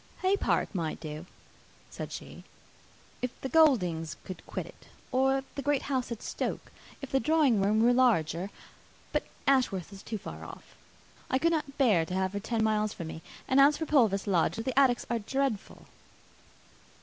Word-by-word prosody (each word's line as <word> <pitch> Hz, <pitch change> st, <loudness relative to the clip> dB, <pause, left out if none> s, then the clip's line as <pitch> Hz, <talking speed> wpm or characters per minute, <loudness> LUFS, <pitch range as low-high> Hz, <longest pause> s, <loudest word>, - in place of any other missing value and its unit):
"Haye 380 Hz, +2 st, +4 dB
Park 405 Hz, -, 0 dB
might 165 Hz, -5 st, -2 dB
do," 155 Hz, +2 st, -7 dB, 0.6 s
said -, -, -6 dB
she, -, -, -8 dB, 0.8 s
"if 250 Hz, -1 st, -4 dB
the 265 Hz, -, -3 dB
Gouldings 180 Hz, -, +3 dB
would 185 Hz, -, -7 dB
quit -, -, -4 dB
it, -, -, -16 dB, 0.2 s
or 270 Hz, +1 st, +2 dB
the 280 Hz, -, -4 dB
great 285 Hz, 0 st, +1 dB
house 260 Hz, -3 st, -2 dB
at 230 Hz, -, -5 dB
Stoke, -, -, -4 dB, 0.3 s
if 275 Hz, -, -6 dB
the 270 Hz, -, +3 dB
drawing 290 Hz, -8 st, +3 dB
room 215 Hz, +3 st, +3 dB
were 245 Hz, +1 st, +5 dB
larger; 195 Hz, -8 st, +2 dB, 0.6 s
but -, -, +1 dB, 0.2 s
Ashworth 225 Hz, -9 st, +1 dB
is 195 Hz, -, -10 dB
too 220 Hz, -, -4 dB
far -, -, -8 dB
off. -, -, -11 dB, 0.6 s
I 260 Hz, -, +2 dB
could 335 Hz, +5 st, +2 dB
not 300 Hz, -4 st, -2 dB
bear 215 Hz, -, +4 dB
to 180 Hz, -, -3 dB
have 190 Hz, 0 st, 0 dB
her 200 Hz, -, -2 dB
ten 220 Hz, +2 st, -1 dB
miles 215 Hz, -1 st, +1 dB
from 165 Hz, -2 st, -6 dB
me; 160 Hz, -, -7 dB, 0.3 s
and 260 Hz, -, +3 dB
as 290 Hz, +2 st, +6 dB
for 320 Hz, -, -2 dB
Purvis 225 Hz, -11 st, +3 dB
Lodge, 180 Hz, -5 st, +2 dB
the 230 Hz, +3 st, -2 dB
attics 255 Hz, -3 st, +3 dB
are 235 Hz, -1 st, 0 dB
dreadful." 265 Hz, 0 st, -2 dB
235 Hz, 175 wpm, -29 LUFS, 195-270 Hz, 0.8 s, as